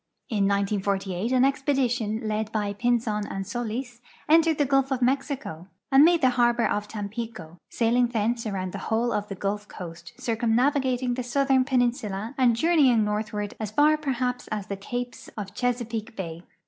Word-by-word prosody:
In 205 Hz, -3 st, +1 dB
1498 200 Hz, 0 st, -1 dB
an 255 Hz, -1 st, +4 dB
expedi 270 Hz, -1 st, +2 dB
tion 220 Hz, -2 st, -2 dB
led 215 Hz, 0 st, -2 dB
b}'' 210 Hz, -2 st, -1 dB
Pinzon 230 Hz, -3 st, +1 dB
and 195 Hz, 0 st, -4 dB
Solis 240 Hz, +3 st, -4 dB, 0.3 s
entered 320 Hz, 0 st, +4 dB
the 290 Hz, -, +2 dB
gulf 270 Hz, 0 st, +2 dB
of 265 Hz, -2 st, 0 dB
Mexico 255 Hz, -, -1 dB, 0.2 s
and 270 Hz, +2 st, +7 dB
made 340 Hz, +1 st, +5 dB
the 255 Hz, -, +4 dB
harbor 240 Hz, 0 st, +3 dB
of 205 Hz, 0 st, -1 dB
Tampico, 205 Hz, -5 st, -6 dB
sailing 240 Hz, +1 st, +2 dB
thence 230 Hz, 0 st, -1 dB
around 185 Hz, -3 st, -3 dB
the 200 Hz, -, -6 dB
whole 230 Hz, +2 st, +1 dB
of 205 Hz, 0 st, -2 dB
the 195 Hz, -, -6 dB
Gulf 205 Hz, +2 st, -3 dB
coast, 170 Hz, -2 st, -9 dB
circumnavigating 250 Hz, +2 st, +1 dB
the 255 Hz, -, -2 dB
southern 265 Hz, +1 st, +2 dB
jieninsula, 240 Hz, -5 st, 0 dB
and 250 Hz, -3 st, +3 dB
journeying 265 Hz, -6 st, +4 dB
northward 210 Hz, 0 st, -2 dB
as 215 Hz, -2 st, -3 dB
far 295 Hz, +8 st, +4 dB
perhaps 250 Hz, -4 st, -2 dB
as 210 Hz, -2 st, -3 dB
the 200 Hz, -, -4 dB
capes 245 Hz, +5 st, -5 dB
of 200 Hz, -2 st, -6 dB
Chesa 245 Hz, -2 st, -1 dB
peake 225 Hz, 0 st, -5 dB
bay. 165 Hz, -3 st, -5 dB
230 Hz, 170 wpm, -26 LUFS, 205-255 Hz, 0.3 s, and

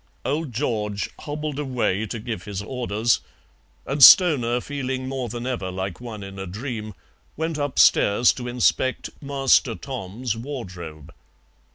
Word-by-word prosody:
Old 150 Hz, 0 st, -1 dB
George 105 Hz, -5 st, -2 dB
hobbled 150 Hz, -1 st, -4 dB
away 120 Hz, -7 st, -1 dB
to 115 Hz, -, -5 dB
give 110 Hz, 0 st, -5 dB
his 100 Hz, -1 st, -5 dB
orders, 115 Hz, -1 st, 0 dB, 0.7 s
and 140 Hz, +2 st, +2 dB
Stoner, 125 Hz, -9 st, +8 dB
feeling 130 Hz, -1 st, -4 dB
more 130 Hz, -2 st, -3 dB
than 120 Hz, +2 st, -5 dB
ever 120 Hz, -8 st, -3 dB
like 95 Hz, +2 st, -5 dB
one 110 Hz, -4 st, -7 dB
in 95 Hz, 0 st, -9 dB
a 95 Hz, -, -5 dB
dream, 110 Hz, +1 st, -6 dB, 0.4 s
went 160 Hz, 0 st, -2 dB
upstairs 125 Hz, -5 st, +4 dB
to 125 Hz, -1 st, -7 dB
inspect 125 Hz, +2 st, 0 dB
"Master 135 Hz, -4 st, +2 dB
Tom's" 120 Hz, -2 st, -5 dB
wardrobe. 95 Hz, -, -8 dB
120 Hz, 135 wpm, -23 LUFS, 105-135 Hz, 0.7 s, Stoner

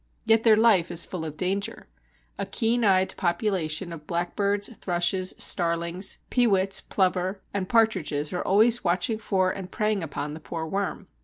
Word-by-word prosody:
Yet 225 Hz, 0 st, +4 dB
their 225 Hz, -2 st, +5 dB
life 215 Hz, -6 st, +4 dB
is 170 Hz, -1 st, +3 dB
full 180 Hz, -3 st, -6 dB
of 155 Hz, -1 st, -7 dB
danger. 195 Hz, +2 st, -2 dB, 0.5 s
A -, -, -3 dB
keen 235 Hz, 0 st, 0 dB
eyed 190 Hz, -2 st, +3 dB
population 175 Hz, -2 st, -1 dB
of 150 Hz, -2 st, -11 dB
blackbirds, 200 Hz, +4 st, -1 dB
thrushes, 180 Hz, +1 st, 0 dB
starlings, 170 Hz, +2 st, +1 dB
peewits 195 Hz, -6 st, +2 dB
(plover), 185 Hz, 0 st, -1 dB
and 190 Hz, -2 st, -3 dB
partridges 185 Hz, -11 st, +1 dB
are 180 Hz, -, -2 dB
always 225 Hz, +5 st, +3 dB
watching 185 Hz, +5 st, 0 dB
for 190 Hz, -4 st, 0 dB
and 185 Hz, -1 st, -7 dB
preying 210 Hz, -2 st, 0 dB
upon 145 Hz, -2 st, -5 dB
the 155 Hz, -, -8 dB
poor 160 Hz, 0 st, -5 dB
worm. 195 Hz, +4 st, -3 dB
185 Hz, 155 wpm, -25 LUFS, 170-205 Hz, 0.5 s, their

